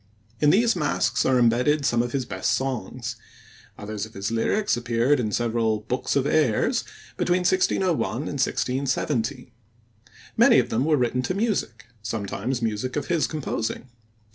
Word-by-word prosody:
In 150 Hz, -, +4 dB
these 230 Hz, +6 st, +4 dB
masques 120 Hz, -, 0 dB
are 130 Hz, -, +3 dB
embedded 125 Hz, +5 st, +3 dB
some 120 Hz, -1 st, +2 dB
of 120 Hz, 0 st, -3 dB
his 135 Hz, -2 st, -2 dB
best -, -, -1 dB
songs; 120 Hz, -2 st, -4 dB, 0.6 s
others 105 Hz, -1 st, -5 dB
of 110 Hz, +1 st, -8 dB
his 100 Hz, +2 st, -3 dB
lyrics 200 Hz, -, +1 dB
appeared 120 Hz, +3 st, +1 dB
in 110 Hz, -3 st, -1 dB
several 115 Hz, -2 st, 0 dB
Bookes 125 Hz, +4 st, -2 dB
of 140 Hz, -1 st, +2 dB
Ayres 145 Hz, -7 st, +2 dB, 0.3 s
between 180 Hz, +1 st, +1 dB
1601 185 Hz, 0 st, +2 dB, 0.2 s
and 130 Hz, +6 st, -4 dB, 0.2 s
1617. 130 Hz, -1 st, -1 dB, 0.8 s
Many -, -, +6 dB
of -, -, +2 dB
them 120 Hz, +5 st, +1 dB
were 155 Hz, -1 st, +3 dB
written 125 Hz, 0 st, 0 dB
to 185 Hz, -, -2 dB
music, 195 Hz, -, -2 dB, 0.2 s
sometimes 110 Hz, +3 st, -3 dB
music 115 Hz, +3 st, -2 dB
of 150 Hz, -, -3 dB
his 170 Hz, -3 st, +2 dB
composing. 130 Hz, -5 st, -4 dB
125 Hz, 150 wpm, -24 LUFS, 115-145 Hz, 0.8 s, Many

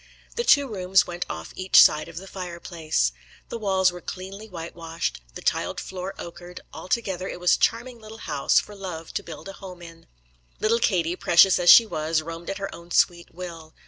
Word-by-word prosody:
The 475 Hz, -, -1 dB
two 285 Hz, -, +5 dB
rooms 190 Hz, -4 st, +2 dB
went 175 Hz, 0 st, -5 dB
off 80 Hz, 0 st, -7 dB
each 185 Hz, 0 st, +5 dB
side 150 Hz, +1 st, +6 dB
of 170 Hz, -1 st, -11 dB
the 190 Hz, -, -7 dB
fire 180 Hz, -3 st, -7 dB
place. 155 Hz, -, -1 dB, 0.4 s
The 230 Hz, -, -5 dB
walls 190 Hz, -3 st, +2 dB
were 180 Hz, 0 st, -10 dB
cleanly 195 Hz, +5 st, -8 dB
white 170 Hz, -3 st, -8 dB
washed, 165 Hz, -, -4 dB
the -, -, -8 dB
tiled -, -, -1 dB
floor 185 Hz, 0 st, -6 dB
ochred; 175 Hz, +1 st, -9 dB
altogether 185 Hz, -3 st, -3 dB
it -, -, -6 dB
was 180 Hz, 0 st, +3 dB
a -, -, +2 dB
charming 240 Hz, +1 st, 0 dB
little 220 Hz, 0 st, -11 dB
house 150 Hz, -9 st, +1 dB
for 210 Hz, -, -9 dB
love 180 Hz, -5 st, -7 dB
to -, -, -2 dB
build 160 Hz, +2 st, -10 dB
a 195 Hz, -, -7 dB
home 185 Hz, -3 st, -11 dB
in. 165 Hz, -1 st, -13 dB, 0.5 s
Little 230 Hz, +2 st, +2 dB
Katie, 175 Hz, -6 st, +1 dB
precious 180 Hz, +2 st, +5 dB
as 175 Hz, -1 st, +3 dB
she 230 Hz, -, +10 dB
was, 155 Hz, -4 st, -1 dB
roamed 165 Hz, +1 st, -7 dB
at 195 Hz, -, -3 dB
her 195 Hz, -1 st, -5 dB
own 170 Hz, 0 st, -12 dB
sweet 170 Hz, 0 st, +1 dB
will. 170 Hz, -3 st, -9 dB
180 Hz, 205 wpm, -24 LUFS, 165-195 Hz, 0.5 s, she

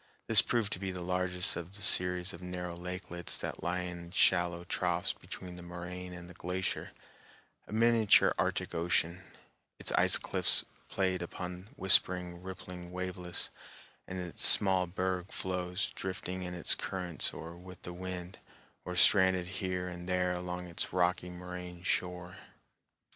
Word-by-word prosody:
This -, -, +9 dB
proved 115 Hz, -4 st, 0 dB
to -, -, -3 dB
be 95 Hz, 0 st, -3 dB
the 90 Hz, -1 st, -5 dB
largest 90 Hz, 0 st, +1 dB
of 85 Hz, +3 st, -6 dB
the 100 Hz, -, -7 dB
series 90 Hz, 0 st, +3 dB
of 85 Hz, -, -10 dB
narrow 90 Hz, -1 st, -4 dB
lakelets 90 Hz, -1 st, -5 dB
that -, -, -5 dB
lie 90 Hz, +3 st, -1 dB
in 85 Hz, -1 st, -6 dB
shallow 85 Hz, -1 st, +3 dB
troughs 90 Hz, 0 st, 0 dB
between 90 Hz, -1 st, -9 dB
the -, -, -8 dB
moraine 90 Hz, +1 st, -7 dB
and 90 Hz, -1 st, -8 dB
the 90 Hz, -, -11 dB
glacier, 90 Hz, +1 st, -3 dB, 0.8 s
a -, -, -12 dB
miniature 115 Hz, -1 st, +5 dB
Arctic -, -, 0 dB
Ocean, 85 Hz, +1 st, +1 dB, 0.6 s
its -, -, -3 dB
ice -, -, +5 dB
cliffs -, -, +2 dB, 0.2 s
played 95 Hz, -2 st, 0 dB
upon 90 Hz, +1 st, -6 dB
by -, -, -18 dB
whispering, 90 Hz, -5 st, +4 dB
rippling 90 Hz, -1 st, -8 dB
waveless 90 Hz, -1 st, -3 dB, 0.6 s
and 95 Hz, 0 st, -4 dB
its 90 Hz, -2 st, -4 dB
small 95 Hz, -2 st, +6 dB
berg 95 Hz, +1 st, -2 dB
floes 90 Hz, +1 st, -2 dB
drifting 95 Hz, -1 st, -4 dB
in 90 Hz, 0 st, -4 dB
its 85 Hz, -, +3 dB
currents 90 Hz, -3 st, -2 dB
or 85 Hz, +1 st, -8 dB
with 90 Hz, 0 st, -12 dB
the 90 Hz, -, -6 dB
wind, 90 Hz, 0 st, -6 dB, 0.4 s
or 90 Hz, -, -5 dB
stranded 95 Hz, -1 st, +5 dB
here 90 Hz, -1 st, -3 dB
and 90 Hz, 0 st, -7 dB
there 90 Hz, 0 st, +2 dB
along 90 Hz, 0 st, -4 dB
its 85 Hz, -1 st, -3 dB
rocky 90 Hz, 0 st, +1 dB
moraine 90 Hz, 0 st, -8 dB
shore. 90 Hz, -1 st, -2 dB
90 Hz, 155 wpm, -32 LUFS, 90-95 Hz, 0.8 s, This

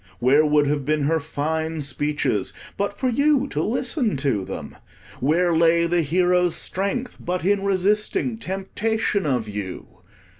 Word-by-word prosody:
Where 135 Hz, +5 st, +4 dB
would 150 Hz, -1 st, +3 dB
have 145 Hz, 0 st, 0 dB
been 150 Hz, +1 st, 0 dB
her 160 Hz, +3 st, +2 dB
fine 160 Hz, +1 st, -3 dB
speeches, 145 Hz, -7 st, -1 dB, 0.2 s
but 200 Hz, 0 st, -2 dB
for 260 Hz, -, -1 dB
you 280 Hz, +2 st, +2 dB
to -, -, -2 dB
listen 245 Hz, -, 0 dB
to 130 Hz, -8 st, 0 dB
them? -, -, -7 dB, 0.4 s
Where 165 Hz, +5 st, +2 dB
lay 170 Hz, +1 st, +4 dB
the 170 Hz, 0 st, +2 dB
hero's 180 Hz, +2 st, +2 dB
strength, 200 Hz, +7 st, -2 dB
but 180 Hz, 0 st, -3 dB
in 200 Hz, 0 st, +2 dB
resisting 210 Hz, +4 st, 0 dB
temptation 200 Hz, 0 st, -1 dB
of 125 Hz, -5 st, 0 dB
you? 100 Hz, -3 st, -7 dB
170 Hz, 145 wpm, -23 LUFS, 145-200 Hz, 0.4 s, Where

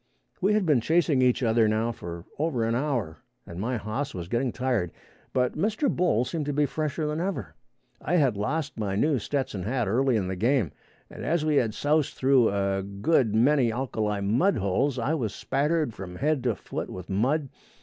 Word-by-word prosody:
We 195 Hz, +3 st, +3 dB
had 210 Hz, -2 st, +2 dB
been 145 Hz, -7 st, +3 dB
chasing 160 Hz, -1 st, +2 dB
each 125 Hz, 0 st, +3 dB
other 115 Hz, -1 st, +3 dB
now 110 Hz, +2 st, +1 dB
for 85 Hz, -5 st, -8 dB
over 145 Hz, -7 st, 0 dB
an 115 Hz, -, 0 dB
hour 120 Hz, -, -1 dB, 0.3 s
and 85 Hz, -, -8 dB
my 120 Hz, +3 st, -1 dB
hoss 110 Hz, +6 st, -4 dB
was 85 Hz, -2 st, -5 dB
getting 120 Hz, +5 st, 0 dB
tired, 125 Hz, -9 st, -1 dB, 0.4 s
but 125 Hz, -1 st, +1 dB
Mr. 215 Hz, -, 0 dB
Bull 170 Hz, -10 st, +2 dB
seemed 155 Hz, +1 st, -3 dB
to 145 Hz, -, -1 dB
be 145 Hz, +1 st, +2 dB
fresher 155 Hz, +2 st, -2 dB
than 150 Hz, +1 st, -2 dB
ever. 175 Hz, -, -3 dB, 0.5 s
I 175 Hz, -, 0 dB
had 135 Hz, -9 st, +3 dB
lost 135 Hz, +5 st, -2 dB
my 100 Hz, -3 st, -1 dB
new 145 Hz, +5 st, +2 dB
Stetson 130 Hz, -4 st, -2 dB
hat 120 Hz, +3 st, -1 dB
early 125 Hz, +5 st, +2 dB
in 100 Hz, -4 st, 0 dB
the 95 Hz, -, -3 dB
game, 115 Hz, -, +1 dB, 0.4 s
and, -, -, -8 dB
as 160 Hz, 0 st, 0 dB
we 150 Hz, -2 st, +2 dB
had 115 Hz, -4 st, +1 dB
soused 150 Hz, 0 st, +1 dB
through 130 Hz, -3 st, +4 dB
a 100 Hz, -1 st, 0 dB
good 105 Hz, +4 st, +1 dB
many 125 Hz, +1 st, +4 dB
alkali 110 Hz, -4 st, -2 dB
mud 125 Hz, -, +2 dB
holes, 110 Hz, +7 st, 0 dB
I 125 Hz, +6 st, 0 dB
was 120 Hz, -10 st, -2 dB
spattered 150 Hz, -1 st, 0 dB
from 90 Hz, -3 st, -8 dB
head 150 Hz, +4 st, 0 dB
to 120 Hz, -4 st, +2 dB
foot -, -, -6 dB
with 90 Hz, -1 st, -8 dB
mud. 130 Hz, +9 st, 0 dB
125 Hz, 195 wpm, -27 LUFS, 105-150 Hz, 0.5 s, through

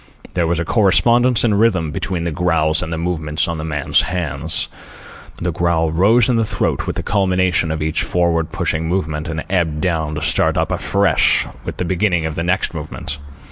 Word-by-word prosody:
There 85 Hz, -2 st, 0 dB
was 85 Hz, 0 st, 0 dB
a 85 Hz, -, -2 dB
correspondence 120 Hz, +5 st, +3 dB
in 115 Hz, -3 st, +2 dB
rhythm 100 Hz, -7 st, +2 dB
between 85 Hz, +2 st, -3 dB
the 85 Hz, -, -2 dB
growls 80 Hz, -2 st, +2 dB
and 80 Hz, -, -4 dB
the 80 Hz, -, -2 dB
movements 80 Hz, -2 st, -1 dB
of 85 Hz, -2 st, -3 dB
the -, -, -4 dB
man's 75 Hz, -2 st, +1 dB
hands. 80 Hz, -3 st, -2 dB, 0.7 s
The 90 Hz, -, -1 dB
growl 85 Hz, -1 st, 0 dB
rose 105 Hz, +8 st, +4 dB
in 125 Hz, -3 st, +2 dB
the 115 Hz, -, +2 dB
throat 110 Hz, -, -1 dB
with -, -, -2 dB
the -, -, -3 dB
culmination 95 Hz, -3 st, +1 dB
of 80 Hz, 0 st, -2 dB
each 80 Hz, 0 st, 0 dB
forward 85 Hz, -2 st, 0 dB
pushing 80 Hz, 0 st, -1 dB
movement, 80 Hz, -3 st, -2 dB
and 80 Hz, -1 st, -3 dB
ebbed 85 Hz, -5 st, 0 dB
down 80 Hz, -3 st, -1 dB
to 75 Hz, -, -4 dB
start 80 Hz, +1 st, +1 dB
up -, -, 0 dB
afresh 100 Hz, -6 st, +2 dB, 0.2 s
with -, -, -5 dB
the 90 Hz, -, -2 dB
beginning 90 Hz, -2 st, 0 dB
of 80 Hz, -, -2 dB
the 85 Hz, -, -3 dB
next 90 Hz, +1 st, 0 dB
movement. 75 Hz, -2 st, -5 dB
85 Hz, 195 wpm, -18 LUFS, 80-95 Hz, 0.7 s, rose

